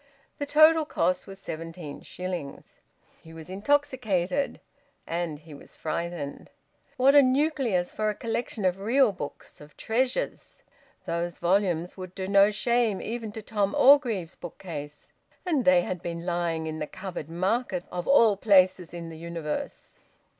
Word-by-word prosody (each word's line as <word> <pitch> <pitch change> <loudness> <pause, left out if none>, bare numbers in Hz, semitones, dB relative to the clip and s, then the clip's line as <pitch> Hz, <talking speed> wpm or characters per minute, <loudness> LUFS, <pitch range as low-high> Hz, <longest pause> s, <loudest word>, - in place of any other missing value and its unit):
The 285 - -3
total 310 +2 +6
cost 180 - 0
was 195 0 -9
seventeen 165 -4 -7
shillings. 180 -6 -7 0.4
He 160 - -14
was 160 +2 -9
intoxicated 245 -2 0 0.5
and 170 -2 -3
he 155 +1 -14
was 140 - -14
frightened. 165 -2 -4 0.5
What 265 +2 +5
a 285 - +9
nucleus 260 - +1
for 215 0 -1
a 210 - -2
collection 230 -2 -3
of 185 +1 +1
real 235 +4 +3
books, 150 -6 -8
of 150 0 -15
treasures! 255 - -2 0.4
Those 170 0 -3
volumes 180 -1 0
would 185 -1 -8
do 190 -1 -4
no 200 +1 +6
shame 235 -1 +1
even 225 -1 -5
to 220 - -7
Tom 200 -2 -1
Orgreave's 235 - +4
bookcase. 150 -4 -8 0.3
And 305 -8 +1
they 180 -1 +5
had 180 -1 -4
been 170 -1 -5
lying 170 -2 -1
in 155 0 -4
the 150 - -3
Covered 180 -5 -7
Market, 225 +10 -1
of 175 -1 -4
all 230 -7 +6
places 185 -4 +3
in 170 -1 -6
the 160 - -10
universe... 165 -2 -5
185 Hz, 145 wpm, -27 LUFS, 170-230 Hz, 0.5 s, a